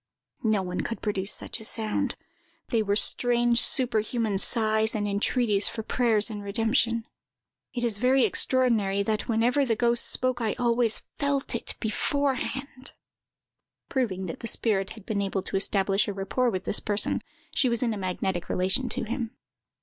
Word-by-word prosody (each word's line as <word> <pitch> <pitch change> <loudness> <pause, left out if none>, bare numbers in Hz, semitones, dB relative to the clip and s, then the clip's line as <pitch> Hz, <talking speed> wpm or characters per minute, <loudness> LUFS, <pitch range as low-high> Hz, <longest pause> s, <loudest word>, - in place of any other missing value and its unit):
No 215 -4 +2
one 180 0 -3
could 230 - -5
produce 200 -2 +2
such - - -5
a - - -10
sound. 225 +4 +1 0.5
They 230 - +2
were 205 -1 0
strange, 240 +2 +3
superhuman 225 -4 0
sighs 220 0 +3
and 205 -1 -1
entreaties 205 0 +2
for 220 - -5
prayers 225 -2 +2
and 210 -3 -6
redemption. 225 +2 0 0.7
"It 245 - -3
is 225 -4 +2
very 255 +2 +4
extraordinary 220 -7 +1
that, 215 +1 -2
whenever 235 +5 +2
the 235 -4 +1
ghost 235 +1 +2
spoke, 255 -1 -1
I 220 -2 0
always 235 -2 +1 0.2
felt 280 -2 0
it 235 - -3
beforehand. 270 +2 -2 1.0
[Proving 200 -8 -1
that 165 - -6
the 230 - -5
spirit 200 -4 +1
had 210 - -13
been 205 -2 -1
able 195 -1 -2
to - - -3
establish 195 0 +1
a 205 - -2
rapport 200 +6 0
with 185 -5 -3
this - - -1
person. 205 0 0 0.3
She 260 - +2
was 235 +1 -1
in 230 -2 0
a - - -4
magnetic 185 -1 -2
relation 190 +8 +2
to - - -2
him. 235 +1 -4
225 Hz, 165 wpm, -27 LUFS, 200-245 Hz, 1.0 s, very